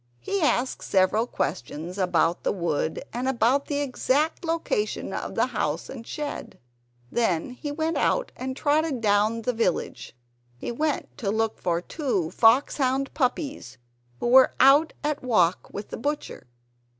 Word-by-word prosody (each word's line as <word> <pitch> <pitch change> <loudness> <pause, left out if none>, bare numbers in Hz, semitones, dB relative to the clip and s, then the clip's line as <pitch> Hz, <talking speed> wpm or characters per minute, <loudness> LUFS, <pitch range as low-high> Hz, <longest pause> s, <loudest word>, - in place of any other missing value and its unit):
He 395 - -2
asked 265 -4 +1
several 195 +5 +2
questions 165 - -4
about 175 -2 +2
the - - 0
wood 170 - -2
and 250 +2 -2
about 265 +2 +2
the 290 -1 -1
exact 285 +3 0
position 325 -11 -2
of - - -4
the - - +3
house - - -2
and 235 -3 -9
shed. 295 -1 -5 0.5
Then 225 -4 0
he 285 +4 -6
went 320 +2 -1
out, - - +1
and 260 +1 -5
trotted 300 -2 +1
down 215 +1 +2
the 250 - 0
village. 225 - -2 0.4
He 125 - -4
went 300 +4 -2
to 215 -6 -1
look 220 +1 0
for 175 -1 0
two 205 - -2
foxhound 265 +4 +3
puppies 280 - -2 0.4
who - - -3
were 255 +2 +6
out 280 +5 +6
at 300 0 -1
walk 185 -8 +2
with 200 +1 -7
the - - -5
butcher. 290 - -4
250 Hz, 150 wpm, -25 LUFS, 205-290 Hz, 0.5 s, were